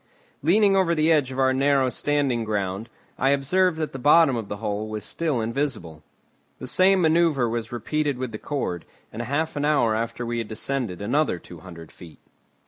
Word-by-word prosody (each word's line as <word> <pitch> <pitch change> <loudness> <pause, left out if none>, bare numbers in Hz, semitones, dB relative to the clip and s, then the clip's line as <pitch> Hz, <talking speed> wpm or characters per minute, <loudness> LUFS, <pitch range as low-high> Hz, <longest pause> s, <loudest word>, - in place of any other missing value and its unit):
Leaning 195 +6 +4
over 180 -3 +2
the 155 +1 +2
edge 145 -5 +2
of 130 - -7
our 130 0 +3
narrow 135 0 +2
standing 135 -2 0
ground, 105 0 -3 0.3
I 135 - +2
observed 160 +6 +2
that 155 -1 -3
the 135 - -6
bottom 145 0 +5
of 115 -3 -4
the 105 - -5
hole 105 0 -3
was 110 -1 -5
still 155 -7 -2
invisible. 110 - -3 0.6
The - - -8
same 185 +8 +3
manoeuvre 160 -6 +3
was 115 -1 -4
repeated 145 +4 -2
with 130 -2 -4
the 110 - -7
cord, 135 - -3 0.3
and 115 - -5
half 145 +7 -2
an 145 - -2
hour 145 -7 +2
after 115 +2 -3
we 120 0 -2
had 115 - -4
descended 110 -4 -3
another 140 - +1
two 85 0 -13
hundred 85 -2 -12
feet. 85 -3 -14
130 Hz, 190 wpm, -24 LUFS, 110-150 Hz, 0.6 s, bottom